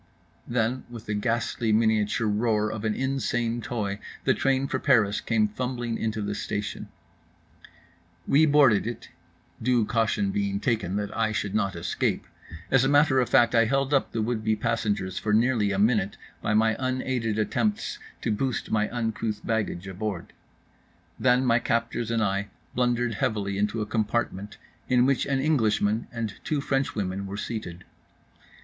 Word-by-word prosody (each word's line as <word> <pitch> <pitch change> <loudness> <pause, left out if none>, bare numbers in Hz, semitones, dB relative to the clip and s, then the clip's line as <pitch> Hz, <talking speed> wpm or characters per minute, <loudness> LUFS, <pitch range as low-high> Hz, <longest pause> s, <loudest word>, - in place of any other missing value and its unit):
Then 120 +2 0
with 115 -2 -9
the 105 - -2
ghastly 115 +1 0
miniature 110 0 +2
roar 105 0 +1
of 110 0 -5
an 110 -1 0
insane 120 -3 -1
toy 105 -4 -3 0.2
the - - +3
train 135 0 +1
for 130 - -2
Paris 115 -8 +3
came 110 -2 +2
fumbling 120 +1 -3
into 110 -2 -2
the 105 0 -2
station…. 105 0 -4 1.4
We 155 +3 +5
boarded 140 -8 +5
it, 120 - -6 0.5
due 120 -1 +2
caution 120 - +1
being 200 0 -1
taken 115 - -1
that 105 0 -3
I 110 -1 +1
should 105 -2 -2
not 100 -3 0
escape. 85 +1 -1 0.5
As 135 -1 +5
a 135 - +2
matter 145 -2 +4
of 125 - +1
fact 120 0 +4
I 115 -1 +5
held 135 +3 0
up 135 - +2
the 115 - -1
would 110 -1 -2
be 110 0 +2
passengers 105 -4 -1
for 105 - -1
nearly 110 -2 +3
a 95 - -1
minute 105 -1 +2 0.2
by 105 - 0
my 110 0 +3
unaided 130 -4 -1
attempts 205 - -1 0.2
to 115 - 0
boost 130 +4 -2
my 110 -1 +1
uncouth 110 -2 -3
baggage 105 -5 -2
aboard. 95 -1 -5 0.9
Then 125 0 +3
my 120 -1 +4
captors 115 0 -1
and 115 -1 +1
I 100 0 0 0.3
blundered 120 -1 +1
heavily 100 -1 -1
into 105 +2 0
a - - -1
compartment 105 -2 -2 0.3
in 125 0 +4
which 135 0 +1
an 135 -1 +1
Englishman 110 -7 +1
and 115 -3 -3
two 150 - -1
French 135 -1 -1
women 100 -1 -3
were 100 +1 -5
seated. 95 -6 -5
115 Hz, 160 wpm, -26 LUFS, 105-125 Hz, 1.4 s, We